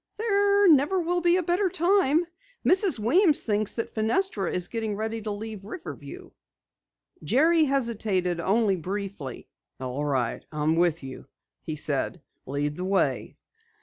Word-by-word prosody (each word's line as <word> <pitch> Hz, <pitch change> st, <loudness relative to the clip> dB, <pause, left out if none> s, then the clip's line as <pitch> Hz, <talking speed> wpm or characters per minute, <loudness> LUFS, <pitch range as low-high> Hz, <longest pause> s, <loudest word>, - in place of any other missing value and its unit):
"There 405 Hz, -2 st, +3 dB
never 310 Hz, +4 st, +4 dB
will 350 Hz, +1 st, 0 dB
be 345 Hz, +1 st, +3 dB
a 370 Hz, -, 0 dB
better 365 Hz, +3 st, +1 dB
time. 345 Hz, -2 st, +2 dB, 0.4 s
Mrs. 375 Hz, -, +3 dB
Weems 300 Hz, -, +3 dB
thinks 210 Hz, -1 st, 0 dB
that 230 Hz, -, -4 dB
Fenestra 220 Hz, -, 0 dB
is 180 Hz, -1 st, -1 dB
getting 220 Hz, -1 st, -3 dB
ready 220 Hz, +2 st, -3 dB
to 215 Hz, -, -5 dB
leave 210 Hz, -1 st, -6 dB
Riverview." 275 Hz, -, -9 dB, 0.9 s
Jerry 315 Hz, +6 st, +3 dB
hesitated 215 Hz, -, 0 dB
only 195 Hz, +2 st, +2 dB
briefly. 185 Hz, -6 st, -6 dB, 0.3 s
"All 130 Hz, +2 st, -4 dB
right, 130 Hz, -5 st, -1 dB
I'm 155 Hz, +1 st, 0 dB
with 170 Hz, -2 st, +1 dB
you," 130 Hz, -1 st, -9 dB, 0.3 s
he 155 Hz, -, -5 dB
said. 150 Hz, +3 st, -2 dB, 0.3 s
"Lead 145 Hz, +2 st, -2 dB
the 180 Hz, -, -4 dB
way." 190 Hz, +1 st, 0 dB
220 Hz, 140 wpm, -26 LUFS, -, 0.9 s, never